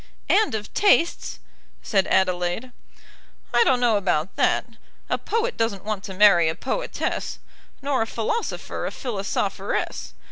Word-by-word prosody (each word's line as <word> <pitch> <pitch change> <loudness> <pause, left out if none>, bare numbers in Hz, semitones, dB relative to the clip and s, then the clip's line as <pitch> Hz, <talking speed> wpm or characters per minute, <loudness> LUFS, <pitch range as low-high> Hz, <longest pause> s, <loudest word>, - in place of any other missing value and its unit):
"And 430 - +3
of 210 -1 -6
tastes," 395 -5 +2 0.5
said 195 -3 +1
Adelaide. 185 +5 +1 0.8
"I 240 - +6
don't 255 -2 +3
know 235 -3 +3
about 180 -3 0
that. - - +2 0.5
A - - +1
poet 460 +2 -1
doesn't 205 -4 -1
want 210 -2 -3
to 190 - -7
marry 185 -5 +6
a 160 - -2
poetess, - - -3 0.5
nor 280 -3 +1
a 225 - 0
philosopher 230 - -3
a - - -4
philosopheress. 210 -6 -3
215 Hz, 135 wpm, -24 LUFS, 190-260 Hz, 0.8 s, I